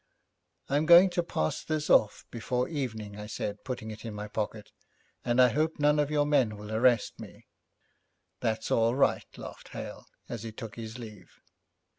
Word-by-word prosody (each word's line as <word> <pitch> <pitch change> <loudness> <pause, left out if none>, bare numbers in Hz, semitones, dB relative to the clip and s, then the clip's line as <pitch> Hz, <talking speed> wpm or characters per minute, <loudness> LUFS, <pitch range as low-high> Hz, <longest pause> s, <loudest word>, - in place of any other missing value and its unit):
'I'm 145 +3 +1
going 175 +2 +8
to 175 - +1
pass 80 - -2
this 155 -1 -2
off 105 - +3
before 125 +2 -1
evening,' 110 -9 -4
I 105 - -6
said, 105 -1 -4
putting 115 -4 -5
it 110 - -10
in 115 -3 -6
my 105 0 -5
pocket, 105 0 -4 0.5
'and 120 +1 +1
I 125 -1 +7
hope 155 +6 0
none 150 0 +3
of 145 -1 +1
your 150 -1 +2
men 130 -8 +2
will 105 +1 -8
arrest 120 +1 +2
me.' - - -11 0.9
'That's 110 0 -2
all 115 +1 +3
right,' 140 - +1
laughed - - -9
Hale - - -8 0.2
as 115 - -5
he 115 0 -6
took 110 0 -8
his 115 +1 -7
leave. 110 -4 -11
115 Hz, 175 wpm, -29 LUFS, 110-145 Hz, 0.9 s, going